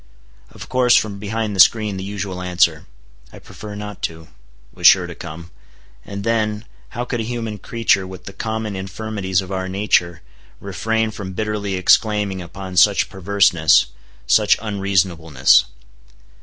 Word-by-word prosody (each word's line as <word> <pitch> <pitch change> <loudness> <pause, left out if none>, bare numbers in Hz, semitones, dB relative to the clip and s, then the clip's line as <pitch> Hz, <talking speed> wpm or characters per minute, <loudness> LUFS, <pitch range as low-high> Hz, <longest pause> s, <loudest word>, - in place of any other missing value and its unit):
Of - - -11
course, 125 -1 +3
from 100 -2 0
behind 105 0 -3
the - - -6
screen 105 +1 +4
the 95 - -5
usual 95 -2 -5
answer, 90 -3 +1 0.4
"I - - -13
prefer 105 -1 -10
not 105 -1 -8
to," 80 -1 -5 0.4
was - - +4
sure - - +6
to - - -8
come; 85 +2 -10 0.5
and 100 0 -7
then, 110 -1 -1 0.2
how 120 0 -5
could 120 -1 -3
a - - -1
human 115 -2 -5
creature 110 -5 0
with 95 -1 -11
the 100 - -9
common 110 -1 -4
infirmities 95 -1 -3
of 95 0 -9
our 95 -1 -3
nature, 90 -3 0 0.4
refrain 110 +3 -2
from 95 -3 -7
bitterly 105 -1 -3
exclaiming 100 0 +2
upon 95 +1 -8
such 100 +2 +4
perverseness—such 80 -11 +2
unreasonableness. 90 - +2
100 Hz, 140 wpm, -20 LUFS, 90-110 Hz, 0.5 s, sure